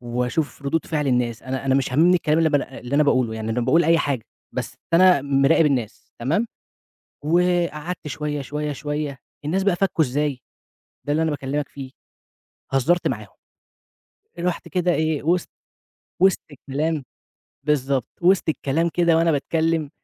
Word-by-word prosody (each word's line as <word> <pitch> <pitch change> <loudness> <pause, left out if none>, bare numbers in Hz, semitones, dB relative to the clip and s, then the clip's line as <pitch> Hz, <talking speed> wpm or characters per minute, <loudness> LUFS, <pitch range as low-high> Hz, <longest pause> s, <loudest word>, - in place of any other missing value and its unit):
وأشوف 125 +5 -2
ردود 150 +4 -1
فِعل 150 -3 -1
الناس، 125 -3 0
أنا 130 +2 -4
أنا 135 - +3
مش 135 -2 +1
هامِمني 175 +6 +5
الكلام 155 -2 +1
اللي 165 -1 +4
ب 145 - -1
اللي 135 -2 -2
أنا 150 - +5
باقوله، 130 -6 +2
يعني 110 0 -4
أنا 120 +2 0
باقول 165 +8 +3
أي 165 0 +4
حاجة، 135 -7 -1 0.3
بس - - -4 0.2
أنا 180 -4 +6
م 140 -1 +1
مِراقب 150 +3 +5
الناس، 125 -4 -2
تمام؟ 155 - 0 0.8
وقعَدت 175 -1 0
شوية، 150 +1 -3
شوية، 150 +2 -3
شوية، 145 -1 -4 0.3
الناس 185 +6 0
بقى 195 -3 +2
فَكُّوا 175 -4 +2
إزاي، 140 0 -1 0.7
ده 145 - -1
اللي 155 - +2
أنا 160 - 0
باكلّمك 145 +1 -2
فيه، 135 -2 -9 0.8
هزّرت 170 +7 +2
معاهم. 110 -4 -4 1.1
رُحت 175 0 -2
كده 180 -1 +1
إيه 155 -2 0
وِسط 175 +2 +1 0.7
وِسط 190 -1 +5
الكلام 145 +2 -2 0.6
بالضبط 140 -4 +1
وِسط 180 -1 +3
الكلام 160 +2 0
كده 170 -2 +3
وأنا 165 0 +3
باتكلّم 160 +1 0
150 Hz, 155 wpm, -22 LUFS, 135-165 Hz, 1.1 s, أنا